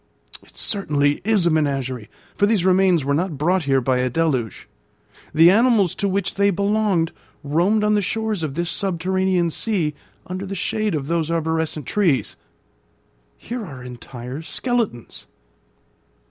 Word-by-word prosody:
It - - -18
certainly 145 -8 0
is 205 -3 +2
a 170 - +3
menagerie, 135 -7 -1 0.2
for 205 - +2
these 205 -5 +1
remains 185 -5 +3
were 140 - +1
not 165 0 -1
brought 175 +3 +1
here 135 -1 +2
by 130 0 +1
a 125 0 +1
deluge. 130 -6 -1 0.6
The 165 +3 +6
animals 220 -4 +3
to 200 - -1
which 195 0 -1
they 200 0 +2
belonged 200 -3 +1 0.3
roamed 175 +9 +2
on 210 0 +3
the 210 - +3
shores 220 -1 -2
of 150 -4 -3
this 170 +1 -1
subterranean 185 0 0
sea, 175 -6 -1 0.3
under 185 +2 -5
the 195 - -5
shade 210 +1 -1
of 140 -3 -3
those 165 0 -1
arborescent 160 -2 -1
trees. 175 -11 +1 1.0
Here 240 -1 -6
are 135 -9 -9
entire 125 +2 -8
skeletons. 225 - -3
170 Hz, 145 wpm, -21 LUFS, 145-200 Hz, 1.0 s, The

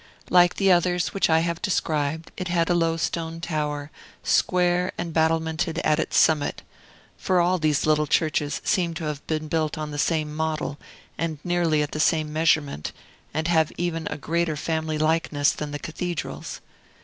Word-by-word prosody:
Like 175 -1 +5
the 195 -1 +3
others 175 0 +2
which 195 - +2
I 160 0 +4
have 170 0 -2
described, 160 -4 -1
it 185 - -4
had 175 -1 +1
a - - +5
low 165 -1 +1
stone 165 0 -3
tower, 150 -3 -3 0.3
square, 180 0 +2
and 170 -2 -4
battlemented 160 +1 +1
at 155 +1 +2
its - - 0
summit: 150 -3 +3 0.5
for 185 -1 +1
all 180 +1 +2
these 155 -2 +1
little 150 -1 +2
churches 150 -1 0
seem 170 -3 +1
to 160 - -5
have 150 -2 -4
been 155 -1 -2
built 155 0 -1
on 155 -1 -4
the 145 - -4
same 155 -1 0
model, 155 -2 -2 0.4
and 165 -2 -2
nearly 170 -4 +2
at 150 - -5
the 155 - -4
same 155 -1 +2
measurement, 155 - +1 0.4
and 160 +1 -1
have 160 -3 +3
even 165 -2 -2
a - - -4
greater 165 +2 -1
family 160 0 -2
likeness 155 -2 +2
than 150 - -5
the 145 - -4
cathedrals. 160 0 -5
160 Hz, 175 wpm, -24 LUFS, 150-170 Hz, 0.5 s, Like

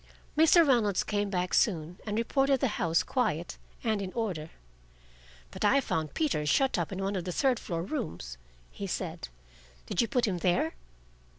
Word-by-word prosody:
Mr. 320 +1 +6
Reynolds 220 -8 +3
came 205 -1 -1
back 180 -2 -1
soon, 175 -3 +1
and 210 0 -1
reported 270 +3 +2
the 270 - +1
house 165 -1 +2
quiet 210 - -1 0.2
and 220 -4 0
in 190 -1 -4
order. 185 -9 -3 1.0
"But - - -6
I 270 +7 +5
found 160 - -2
Peter 295 - 0
shut 265 - +2
up 170 - -2
in 195 0 -3
one 195 +1 -1
of 185 - -2
the 180 - -4
third 255 +5 +2
floor 165 -2 -3
rooms," 85 - -5 0.3
he - - -6
said. - - -4 0.6
"Did - - 0
you 235 - +1
put 245 +3 +1
him 185 -5 -1
there?" 175 -2 +1
200 Hz, 175 wpm, -29 LUFS, 170-250 Hz, 1.0 s, Mr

